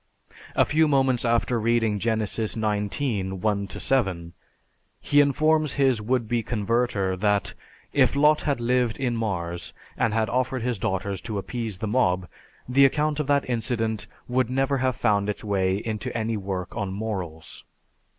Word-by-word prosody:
A - - +4
few 155 +1 +3
moments 135 -4 +2
after 120 +1 +1
reading 115 -2 +1
Genesis 110 0 -1
XIX, 105 -1 -1
1 100 0 -1
7, 95 -10 -1 0.7
he 145 0 +4
informs 155 +1 +2
his 130 -5 +2
would 120 +1 0
be 120 +1 0
converter 110 -3 0
that 105 +1 +1 0.4
if - - +3
Lot 150 +2 +4
had 140 -4 -1
lived 120 -1 +1
in 125 -3 -1
Mars 85 -7 -3 0.2
and 115 - +1
had 110 0 +1
offered 130 +2 -1
his 120 -4 -1
daughters 95 0 -2
to 110 -3 -4
appease 110 0 -4
the 110 - -3
mob, 95 -6 +1 0.4
the 130 +2 +4
account 150 +2 +2
of 150 - -1
that 145 -1 +2
incident 115 -4 -1 0.2
would 125 -1 +1
never 135 +1 +1
have 130 -1 +1
found 105 -3 +1
its 105 - -4
way 95 -3 +1
into 110 0 -4
any 115 0 -1
work 95 -3 -4
on 100 -4 -2
morals. 95 -6 -5
115 Hz, 155 wpm, -25 LUFS, 100-130 Hz, 0.7 s, A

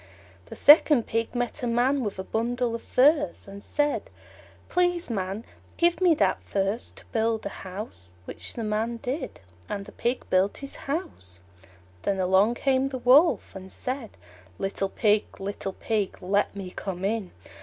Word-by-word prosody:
The - - -9
second 295 -4 +7
Pig 230 +2 -2
met 245 +4 -2
a 245 - -1
Man 250 +3 +2
with 205 -3 -3
a 190 - -3
bundle 235 +3 -1
of 230 - -4
furze, 295 0 +2
and 200 0 -9
said, 295 0 -1 0.6
"Please, 355 -5 +1
Man, 195 +1 -3 0.3
give 345 +1 +2
me 350 -3 +5
that - - +1
furze 200 +4 -2
to - - -13
build 225 -1 0
a - - -1
house"; 185 - -8
which - - -7
the 230 - -3
Man 220 +2 -1
did, 255 +7 -5 0.3
and 200 -1 -4
the - - -11
Pig 245 +2 -2
built 185 +2 +3
his 275 0 -7
house. 275 - -4 0.6
Then 195 -1 -1
along 190 +5 +3
came 265 +1 +1
the 265 - -4
Wolf 255 - +4
and 190 0 -9
said, 255 -3 -5 0.4
"Little 195 0 -2
Pig, 210 +1 +1
little 195 0 -4
Pig, 210 -2 -2
let 200 +2 0
me 190 -2 -6
come 190 -1 -4
in." 210 -2 -1
225 Hz, 165 wpm, -26 LUFS, 195-265 Hz, 0.6 s, second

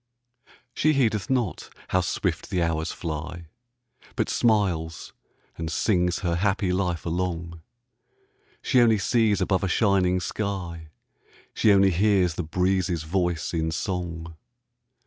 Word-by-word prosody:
She 155 +1 +2
heedeth 110 -8 +1
not 125 -8 -1 0.2
how - - +2
swift - - -2
the 90 -2 0
hours 80 0 -1
fly, 85 +1 -6 0.7
But - - 0
smiles 95 -8 0 0.5
and 80 -1 -3
sings 90 0 +1
her 85 -2 0
happy 95 -1 +1
life 90 -4 -1
along; 85 -1 -3 1.0
She 130 -3 +4
only 115 -2 +5
sees 110 +1 +2
above 95 -1 +1
a - - +1
shining 95 -2 +2
sky; 90 -5 -4 0.7
She 110 - +3
only 100 -1 +5
hears 95 -1 +2
the 85 - -3
breezes' 90 0 0
voice 85 0 -1
in 80 -1 0
song. 85 -1 -4
90 Hz, 125 wpm, -25 LUFS, 85-100 Hz, 1.0 s, only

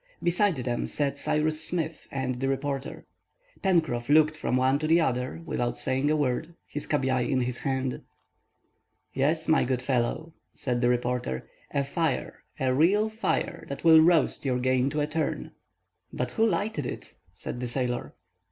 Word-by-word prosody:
Beside 180 +2 +2
them 120 -2 -2
sat 140 -2 -1
Cyrus 155 +2 0
Smith 160 -2 -3
and 130 -2 -2
the 135 - 0
reporter. 135 +1 -3 0.6
Pencroff 160 -10 +1
looked 155 +1 +5
from 140 -4 0
one 130 +2 +3
to 155 - -1
the 165 +2 +5
other 130 +1 -1
without 120 -6 -2
saying 135 +3 0
a 155 - +3
word, 150 +3 -1
his 145 - -5
cabiai 130 -4 +1
in 130 -2 +2
his 125 0 -2
hand. 130 -2 -2 1.1
"Yes, 155 +4 +1
my 160 0 +4
good 125 0 -1
fellow," 130 +5 -1 0.2
said 125 -2 -2
the 120 - +3
reporter, 125 - -1 0.3
"a 140 - 0
fire, 145 -1 -2 0.2
a 130 -1 +2
real 195 +10 +3
fire, 210 -7 -2
that 140 - -6
will 160 -1 +8
roast 165 0 +3
your 130 -3 +1
game 130 +1 +2
to 150 +2 -1
a - - +2
turn." 155 +1 -2 0.6
"But - - -3
who 225 0 +2
lighted 185 - -1
it?" - - -7 0.2
said - - -6
the 125 - -2
sailor. 125 0 -2
140 Hz, 165 wpm, -27 LUFS, 125-160 Hz, 1.1 s, will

